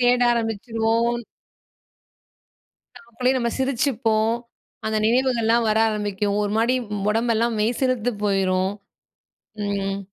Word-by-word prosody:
தேட 245 0 +3
ஆரம்பிச்சுருவோம். 230 +1 0 1.8
நமக்குள்ளேயே 250 +3 -1
நம்ம 235 -1 0
சிரிச்சுப்போம். 230 -4 +1 0.5
அந்த 220 0 0
நினைவுகள்லாம் 235 -2 +2
வர 215 +1 +2
ஆரம்பிக்கும். 205 -1 -1
ஒரு 205 - -1
மாரி 235 +3 +2 0.4
உடம்பெல்லாம் 230 +1 +1
மெய்சிலுத்து 245 +1 0
போய்ரும். 190 -1 +1 1.0
ம். 195 -1 -2
225 Hz, 90 wpm, -23 LUFS, 210-240 Hz, 1.8 s, தேட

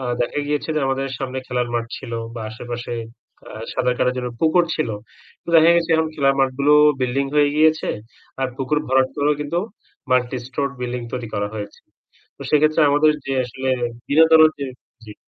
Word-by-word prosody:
আ - - -6 0.2
দেখা 120 - -3
গিয়েছে 150 0 -2
যে - - +2
আমাদের 135 0 -1
সামনে 130 -1 -4
খেলার 125 -1 -1
মাঠ 115 -1 -1
ছিল 115 - -9 0.2
বা 115 - -6
আশেপাশে 120 +1 -6 0.6
আ - - -12 0.2
সাতার 125 -1 0
কাটার 125 0 +1
জন্য 125 -1 -3
পুকুর 170 +2 +4
ছিল। 155 - -1 0.6
তো - - -19
দেখা 165 +1 +7
গেছে 170 0 0
এখন 160 0 +1
খেলার 135 -2 +2
মাঠগুলো 135 +2 +3 0.3
বিল্ডিং 130 +2 0
হয়ে 145 -1 +4
গিয়েছে। 155 +1 +3 0.5
আর 135 - 0
পুকুর 135 +2 0
ভরাট 130 0 +3
করেও 145 +1 +2
কিন্তু 150 +4 -2 0.5
মাল্টি 125 0 +1
স্টোরড 140 +2 -3
বিল্ডিং 125 0 -3
তৈরি 125 -3 -4
করা 100 0 -1
হয়েছে। 105 -1 -7 0.6
তো - - -10
সেক্ষেত্রে 155 +1 +3
আমাদের 150 +2 +4
যে 135 - -2
আসলে 130 +2 -3 0.4
বিনোদনের 160 +1 +6
যে 140 - -3 0.4
জি। 105 - -10
135 Hz, 175 wpm, -21 LUFS, 125-150 Hz, 0.6 s, দেখা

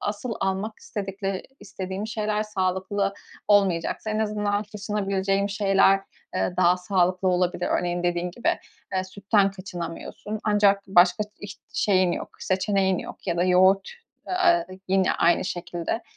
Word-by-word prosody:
asıl 210 +4 -3
almak 195 +3 -2
istedikleri 195 -1 -4 0.2
istediğim 190 +1 -5
şeyler 215 -1 -1
sağlıklı 195 0 -1 0.3
olmayacaksa 200 +1 +2
en 215 - -1
azından 210 -1 0
kaçınabileceğim 200 -1 -1
şeyler, 195 -1 +3 0.3
eee, 185 - 0
daha 180 0 +4
sağlıklı 185 0 +1
olabilir. 180 0 +1
Örneğin 175 0 -2
dediğin 175 0 0
gibi, 240 - -2 0.5
eee, 185 0 0
sütten 200 +1 +1
kaçınamıyorsun 185 +2 -6
ancak 205 -2 +3
başka 180 +2 +5 0.2
iç 200 -1 -8 0.2
şeyin 185 -3 +3
yok, - - -4
seçeneğin 190 -1 +1
yok - - -9
ya 170 -2 0
da 175 - +2
yoğurt, 185 +2 +4 0.4
eee, 350 -2 +3 0.2
yine 190 0 +3
aynı 170 - +3
şekilde, 175 +4 -3
195 Hz, 130 wpm, -25 LUFS, 185-205 Hz, 0.5 s, başka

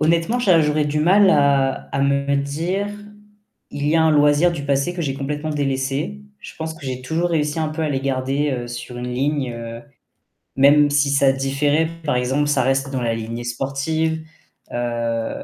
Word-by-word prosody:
Honnêtement 165 +9 +2
j'ar 185 -9 +4
j'aurais 150 0 +1
du 150 +1 -1
mal 190 +5 +5
à 140 -3 +2
à 135 - 0
me 140 0 +1
dire: 165 +8 -2 0.8
«Il 145 0 -3
y 165 - +3
a 160 - +4
un 160 - +4
loisir 150 +3 +4
du 160 -4 -5
passé 140 +5 0
que 175 - -3
j'ai 135 -3 -2
complètement 150 +2 -4
délaissé». 135 - -2 0.2
Je - - -10
pense 160 0 -5
que 160 -2 -13
j'ai 130 -1 -4
toujours 165 +6 -1
réussi 150 -1 0
un 160 -1 0
peu, 155 +1 -4
à 155 - 0
les 135 -2 -1
garder, 135 +2 -1
heu, 120 -2 -4
sur 120 0 -7
une 125 0 -4
ligne, 135 0 -1
heu, 115 0 -7 0.8
même 145 +2 +6
si 145 0 +2
ça 140 -1 +4
différait, 140 +4 +1 0.2
par 145 -4 0
exemple: 130 +4 0
ça 145 -3 +2
reste 135 +1 0
dans 130 -2 -2
la 115 -1 0
lignée 115 +1 -5
sportive, 155 +6 -2 0.5
heu. 115 -1 -2
140 Hz, 190 wpm, -21 LUFS, 130-155 Hz, 0.8 s, même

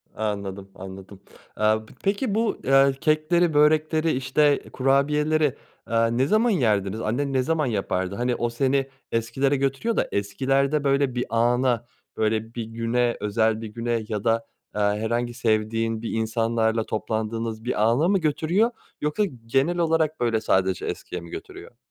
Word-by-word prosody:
Anladım, 100 -2 -4
anladım. 95 +1 -10 0.3
Aaa, 110 +1 +1
p - - -17
peki, 200 +2 0
bu 225 0 +1 0.4
kekleri, 155 +2 +2
börekleri, 155 +2 +3
işte, 135 +3 +2
kurabiyeleri, 150 +2 +2 0.3
aaa, 115 0 +2
ne 125 +4 +1
zaman 220 +5 +3
yerdiniz? 110 - +1
Annen 135 +6 -1
ne 130 - +3
zaman 160 0 0
yapardı? 100 -4 -2
Hani, 120 +1 0
o 120 0 -1
seni 135 +3 0 0.2
eskilere 120 +5 0
götürüyor 135 - -1
da - - +1
eskilerde, 135 +8 0
böyle, 140 -2 +1
bir 125 - -1
ana, 120 +1 +2 0.3
böyle, 110 +1 0
bir 115 - -3
güne, 115 +2 -1
özel 110 +1 +1
bir 110 - -5
güne 115 +1 -2
ya 105 -2 -3
da, 115 0 +1 0.3
aaa, 105 0 +1
herhangi 120 +2 -1
sevdiğin 115 -1 0
insanlarla 115 0 0
toplandığınız 110 +1 -3
bir 120 -3 0
ana 145 +9 +2
mı 195 -1 +3
götürüyor, 170 +9 +1 0.3
yoksa 150 +8 0 0.2
genel 135 +9 +1
olarak 160 -2 +1
böyle 115 -2 +1
sadece 95 -4 +1
eskiye - - -5
mi 85 - -11
götürüyor? 120 - -10
120 Hz, 145 wpm, -24 LUFS, 110-145 Hz, 0.4 s, börekleri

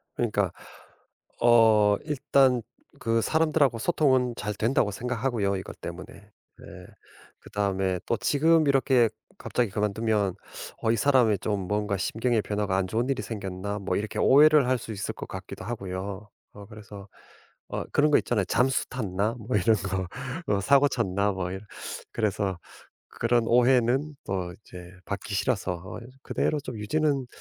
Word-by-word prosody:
그러니까 105 -6 0 0.9
어 110 -3 +5
일단 135 -4 +2 0.4
그 115 0 +1
사람들하고 155 -5 +2
소통은 130 -5 +2
잘 105 0 -3
된다고 110 0 +1
생각하고요, 115 -3 -1
이것 95 - -9
때문에. 85 +2 -7
예. 100 +1 -19 0.7
그다음에 95 -3 -1
또 115 - +1
지금 155 +6 +3
이렇게 130 -4 +3 0.3
갑자기 120 -4 -1
그만두면 105 -1 0 0.5
어 110 - +2
이 115 - +1
사람이 125 -5 +3
좀 100 -2 -2
뭔가 105 -1 -1
심경의 115 +4 0
변화가 105 -2 -1
안 95 -1 0
좋은 115 +6 -1
일이 135 -2 0
생겼나 100 -2 -5
뭐 100 - -2
이렇게 105 +1 -4
오해를 150 -1 +6
할 130 - +2
수 115 - -8
있을 100 0 -4
것 - - -7
같기도 - - -8
하고요. 100 -2 -5 0.3
어 100 -1 -11
그래서 105 -1 -11 0.6
어 - - -3
그런 150 +1 +4
거 - - +6
있잖아요. 105 -5 -1
'잠수 125 +7 +1
탔나?' 105 -2 -2
뭐 110 +2 -3
이런 105 +3 +3
거. 95 -2 -3 0.5
'어 100 - -1
사고 140 +7 +5
쳤나?' 100 -4 0
뭐 95 -1 -3
이런. 95 +1 -6 0.5
그래서 100 -4 -1 0.5
그런 120 0 +1
오해는 125 +4 +3
어 90 -2 -2
이제 90 -2 -12
받기 100 0 -4
싫어서 95 -2 0
어 90 +6 -9 0.2
그대로 150 0 -1
좀 130 -4 -7
유지는 140 +4 0
110 Hz, 305 characters per minute, -26 LUFS, 100-125 Hz, 0.9 s, 오해를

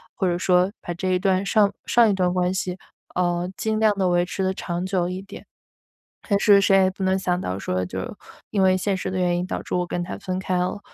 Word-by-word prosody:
或 190 - 0
者 175 0 +1
说 180 +1 +2
把 175 - -5
这 185 +2 -3
一 185 - +2
段 190 +1 +1
上 205 -1 +3
上 235 -2 +5
一 - - +2
段 180 -2 +1
关 180 0 +1
系， 185 -1 -3 0.4
呃， 175 0 0
尽 220 0 -1
量 215 -2 +3
地 190 -2 +2
维 175 0 +2
持 190 +1 -3
得 190 0 +1
长 175 -1 -4
久 180 -2 0
一 185 +1 -5
点， 200 +1 -11 0.8
但 200 -1 +3
是 200 -2 +6
谁 195 0 +4
也 185 - +3
不 190 0 -8
能 190 0 +2
想 180 -1 -1
到 95 - -3
说 90 -1 -2
就 - - -5
是 - - -6 0.4
因 200 -2 +1
为 185 0 +4
现 195 +2 0
实 185 - -4
的 185 - -3
原 175 -1 +1
因 180 - -2
导 - - -4
致 - - -5
我 180 0 0
跟 175 0 -3
他 175 - -6
分 185 -2 -4
开 185 -1 -1
了。 180 +3 -2
185 Hz, 275 characters per minute, -23 LUFS, 180-195 Hz, 0.8 s, 是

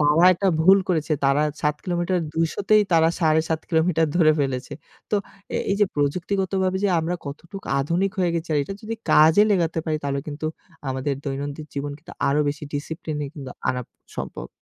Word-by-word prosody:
তারা 150 +4 +4
একটা 195 +2 +1
ভুল 190 +4 +7
করেছে 160 -3 0
তারা 140 +2 +3 0.2
৭ 150 0 +1
কিলোমিটার 175 0 0 0.2
২০০ 165 0 +1 0.2
তেই 215 0 +7
তারা 165 -1 +5
৭.৫ 160 0 +2
কিলোমিটার 165 -1 +2
ধরে 155 -3 +6
ফেলেছে। 135 -2 -2 0.4
তো 210 - +3 0.4
এই, - - 0
এই - - +3
যে 205 - +6
প্রযুক্তিগতভাবে 185 +5 0
যে - - +4
আমরা 165 +2 -1
কতটুকু 170 +7 -8
আধুনিক 175 +7 0
হয়ে 180 -2 +2
গেছি 165 0 -3
আর - - +3
এটা 195 - -6
যদি 225 +1 -4 0.2
কাজে 160 +6 +7
লেগাতে 170 -4 +1
পারি 155 -2 0
তাহলে 140 0 -1
কিন্তু 150 +1 -4 0.4
আমাদের 130 +2 -1
দৈনন্দিন 145 +2 -4
জীবন 140 +1 -3
কিন্তু 155 - -13 0.2
আরো 145 +2 +3
বেশি 145 +1 -4
ডিসিপ্লিনে 150 0 -4
কিন্তু 135 -4 -7 0.2
আনা 125 - 0 0.4
সম্ভব। - - -5
160 Hz, 175 wpm, -23 LUFS, 145-180 Hz, 0.4 s, ভুল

